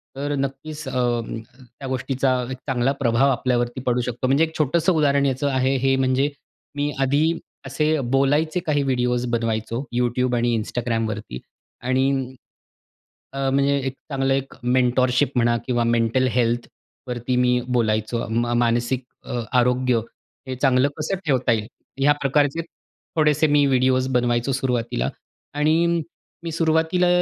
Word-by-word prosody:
तर 145 +2 -2
नक्कीच 140 +2 -5
अ, - - -4 0.9
त्या 135 - -6
गोष्टीचा 130 +1 0 0.2
एक 130 - -5
चांगला 125 0 +1
प्रभाव 120 +2 +3
आपल्यावरती 120 0 -1
पडू 125 0 +2
शकतो. 125 +1 -2
म्हणजे 140 +5 +3
एक 160 0 -2
छोटंसं 160 +5 +2
उदाहरण 140 -3 +2
याचं 135 +1 0
आहे 130 +1 +1
हे 135 +1 +2
म्हणजे 130 +2 +2 0.5
मी 145 0 -1
आधी 150 +5 +2 0.3
असे 150 +3 0
बोलायचे 150 +5 +2
काही 145 -2 +1
व्हिडिओज 125 -2 0
बनवायचो 115 0 -1 0.2
YouTube 125 0 +1
आणि 120 0 +1
Instagramवरती 110 - -3 0.4
आणि 130 +2 +1 1.2
अ, 135 -1 -1
म्हणजे 140 +1 +2
एक 135 - -2 0.2
चांगलं 135 0 +1
एक 135 0 -2
मेंटॉरशिप 125 +2 +2
म्हणा 120 0 +3
किंवा 120 -2 +1
मेंटल 115 +2 +2
हेल्थवरती 120 +1 -3
मी 125 0 +3 0.2
बोलायचो 110 +1 0
म 120 +1 0
मानसिक 120 +2 +1 0.2
अ, 120 - -3 0.2
आरोग्य 125 -1 +2 0.5
हे 130 - -3
चांगलं 130 +1 +3
कसं 155 +5 -1
ठेवता 130 -5 +2
येईल? 110 -2 0 0.3
ह्या 145 +2 +5
प्रकारचे 145 +3 +2 0.6
थोडेसे 150 0 +3
मी 145 -1 +4
व्हिडिओज 130 -1 +2
बनवायचो 120 +1 +1
सुरुवातीला. 120 - -1 0.5
आणि 165 +3 +2 0.4
मी 165 - -4
सुरुवातीला 160 +2 +2
130 Hz, 135 wpm, -22 LUFS, 120-140 Hz, 1.2 s, ह्या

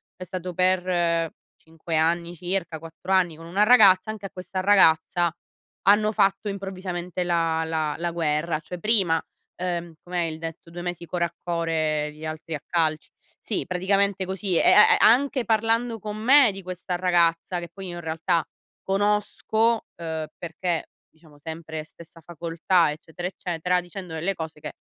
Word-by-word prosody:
è 185 - -8
stato 180 0 -5
per 175 -2 +1 0.3
5 160 0 -5
anni 170 +2 +1
circa, 175 -1 -3
4 165 +3 -8
anni 180 -4 +3
con 165 +1 -12
una 190 +5 +2
ragazza, 210 -4 +6
anche 210 -2 -7
a - - -17
questa 185 +1 -5
ragazza, 175 -3 +4 0.6
hanno 210 +1 +5
fatto 195 +1 +2
improvvisamente 185 -3 -4
la 165 -2 +1
la 155 -2 -1
la 170 +1 -2
guerra, 160 -1 0
cioè 180 +3 -8
prima, 190 -5 +2 0.4
uhm, 175 -2 -3
com'è 180 0 -3
il 160 -2 -2
detto: 165 +1 -7
"2 175 +1 -7
mesi 175 -1 -4
core 170 0 -1
a 170 0 -7
core, 160 -3 -1
gli 155 +1 -13
altri 155 +1 -5
a 145 - -7
calci". 160 -3 0 0.3
Sì, 215 - -2
praticamente 190 +2 +1
così 190 -1 -2
e - - +4
e - - +7
e 210 - +7
anche 255 +2 +4
parlando 225 +1 +1
con 210 +1 -6
me, 255 +2 +6
di 195 0 -8
questa 180 0 -5
ragazza 175 -1 +2
che 170 -1 -8
poi 195 -1 -8
io 175 - -6
in 175 - -6
realtà, 165 +1 -1 0.4
conosco, 210 +3 +1
uhm 160 -2 -4
perché, 170 0 -3 0.2
diciamo 155 -2 -21
sempre 160 0 -6
stessa 165 +1 -16
facoltà, 170 +1 +1
eccetera, 160 +3 -6
eccetera, 180 -1 -1
dicendo 180 0 -9
delle 170 +5 -2
cose 160 -2 -7
che, 150 - -7
175 Hz, 165 wpm, -25 LUFS, 165-190 Hz, 0.6 s, e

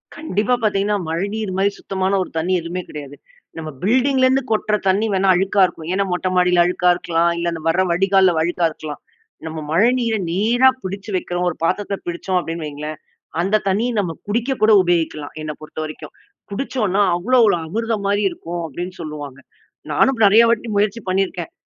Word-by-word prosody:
கண்டிப்பா 235 - -1
பார்த்தீங்கன்னா 205 0 +1
மழைநீர் 200 +5 -2
மாரி 200 +1 +2
சுத்தமான 190 0 -2
ஒரு - - -10
தண்ணி 175 +4 0
எதுவுமே 170 +2 -4
கிடையாது. 145 -2 -8 0.4
நம்ம 160 -1 -5
பில்டிங்லேருந்து 260 +4 +3
கொட்டுற 215 -1 +1
தண்ணி 195 +4 +2
வேண்ணா 190 0 +2
அழுக்கா 195 +2 +2
இருக்கும். 165 -3 -7
ஏன்னா 200 +1 +1
மொட்ட 180 +1 -1
மாடியில 180 -1 +4
அழுக்கா 180 0 +1
இருக்கலாம். 170 0 +1
இல்ல 170 0 -1
அந்த 165 - -6
வர்ற 165 +3 +3
வடிகால்ல 190 0 +3
அழுக்கா 175 +1 0
இருக்கலாம். 155 -1 -8 0.4
நம்ம 160 0 -5
மழைநீரை 230 +4 +2
நேரா 235 +8 +4
பிடிச்சி 195 +2 -6
வக்கிறோம் 180 0 -1
ஒரு 165 - -5
பாத்துரத்துல 200 +3 0
பிடிச்சோம் 175 +2 -2
அப்படின்னு 165 -2 -5
வைங்களேன். 150 +1 -6 0.4
அந்த 195 +4 +1
தண்ணி 200 +4 +1
நம்ம 180 -5 -1 0.2
குடிக்க 235 +5 -1
கூட 220 - +6
உபயோகிக்கலாம் 165 -4 -1
என்ன 155 - -3
பொறுத்த 155 0 -9
வரைக்கும். 155 - -9 0.4
குடிச்சோன்னா 210 -3 -1
அவ்வளோ 245 +9 +2
ஒரு 205 - +4
அமிர்தம் 220 +2 -2
மாதிரி 205 +1 +1
இருக்கும் 170 0 -6
அப்படின்னு 175 +5 -6
சொல்லுவாங்க. 145 -4 -7 0.5
நானும் 265 -4 +2
நெறைய 215 +4 +7
வாட்டி 230 0 0
முயற்சி 210 +3 +1
பண்ணியிருக்கேன். 185 -3 -1
190 Hz, 165 wpm, -20 LUFS, 170-210 Hz, 0.5 s, நெறைய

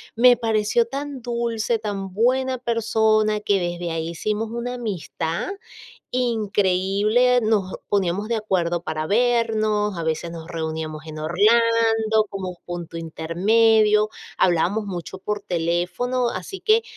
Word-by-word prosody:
me 245 +1 +7
pareció 225 0 +1
tan 275 0 -5
dulce, 235 -1 -1
tan 200 -3 -4
buena 255 +5 +1
persona, 220 -2 +1
que 200 -2 +1
desde 175 -1 -3
ahí 165 0 -3
hicimos 215 +5 -2
una 235 +2 -4
amistad 185 - -3 0.6
increíble. 215 0 +2
Nos 210 -4 +1 0.2
poníamos 200 +1 0
de 230 - 0
acuerdo 175 -5 -1
para 155 -1 -3
vernos, 215 -3 +1
a 165 - -3
veces 160 +1 -2
nos 165 -1 -8
reuníamos 160 -1 -4
en 155 0 -7
Orlando, 220 +4 +3
como 190 -2 -5
un 180 - -10
punto 170 -1 -6
intermedio. 210 +7 +3 0.3
Hablábamos 185 +5 +2
mucho 185 -1 -6
por 210 +2 -3
teléfono, 180 +8 -1
así 235 - -6
que 445 +1 +3
210 Hz, 125 wpm, -23 LUFS, 175-230 Hz, 0.6 s, me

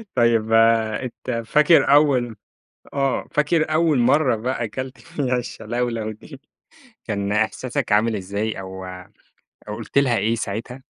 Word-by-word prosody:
طيب 115 -2 +2
آآ، 115 +1 +3
أنت 120 -1 -4
فاكر 150 +5 +4
أول 140 -5 +4
م - - -12 0.6
آه، 135 -2 0
فاكر 155 +1 +1
أول 160 -3 +3
مرّه 130 +1 +3
بقى 120 +1 -2
كلت 130 +5 -6
فيها 135 -7 -2
الشلَولَو 115 -1 -3
دي، 135 +6 -13 0.6
كان 100 -2 -2
إحساسك 115 +3 -1
عامل 110 +1 +3
إزاي 100 +2 -3
أو 95 0 -8 0.9
أو 105 - -4
قُلت - - -5
لها 130 -4 +3
إيه 115 +2 +1
ساعتها؟ 115 +5 -5
120 Hz, 135 wpm, -22 LUFS, 110-135 Hz, 0.9 s, فاكر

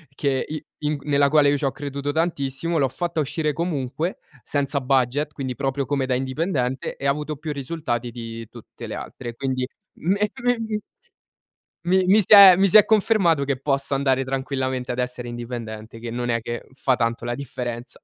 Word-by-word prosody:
che 135 -2 0
i 155 0 -6
in 150 0 -1
g - - -15
nella 140 -1 +3
quale 150 -1 +5
io 145 - +3
c'ho 135 -2 0
creduto 140 0 -4
tantissimo, 160 0 -1
l'ho 135 - +3
fatta 165 +5 -3
uscire 150 +1 0
comunque 160 0 -2 0.3
senza 140 -1 -1
budget, 135 +3 +1
quindi 130 -2 -4
proprio 135 0 -1
come 140 -2 0
da 130 - +1
indipendente 130 -1 -2
e 140 - -7
avuto 150 +2 0
più 155 +1 -5
risultati 130 -4 -3
di 115 -1 -7
tutte 120 -2 -11
le - - -5
altre. 120 -2 -7
Quindi 130 -1 -2 0.3
me 200 +5 +1
mim 225 -3 0 1.0
mi 185 +2 +3
mi 205 +3 +6
si 205 - +4
è 195 -3 +11
mi 195 +2 +4
si 200 - +7
è 210 - +7
confermato 195 -8 +3
che 140 -1 -1
posso 140 -1 0
andare 135 -1 +2
tranquillamente 130 -1 -2
ad 120 - -4
essere 125 -1 -3
indipendente, 115 -2 -7
che 115 0 -6
non 120 +1 -3
è 115 -1 +1
che 120 +1 -5
fa 130 -1 +1
tanto 115 0 -1
la 120 0 -2
differenza. 125 -3 -5
140 Hz, 185 wpm, -23 LUFS, 125-155 Hz, 1.0 s, è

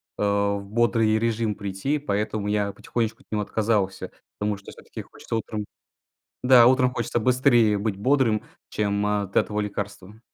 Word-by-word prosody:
а, 100 0 +1
в 100 - -7
бодрый 115 -1 +2
режим 115 -1 0
прийти. 100 +8 -2
Поэтому 105 -5 -2
я 105 -1 0
потихонечку 115 +2 -3
от - - -49
него 105 - 0
отказался, 105 -2 -1 0.3
потому 105 -1 -1
что 100 - -12
всё-таки - - -10
хочется - - -7
утром 110 -2 -3 0.8
Да, 125 -2 +7
утром 130 0 +4
хочется 120 0 -1
быстрее 120 -3 +3
быть 100 -1 -2
бодрым, 125 -2 +2 0.3
чем 100 -1 -1
от 105 -2 -1
этого 105 0 +1
лекарства. 100 0 -6
105 Hz, 150 wpm, -24 LUFS, 100-115 Hz, 0.8 s, Да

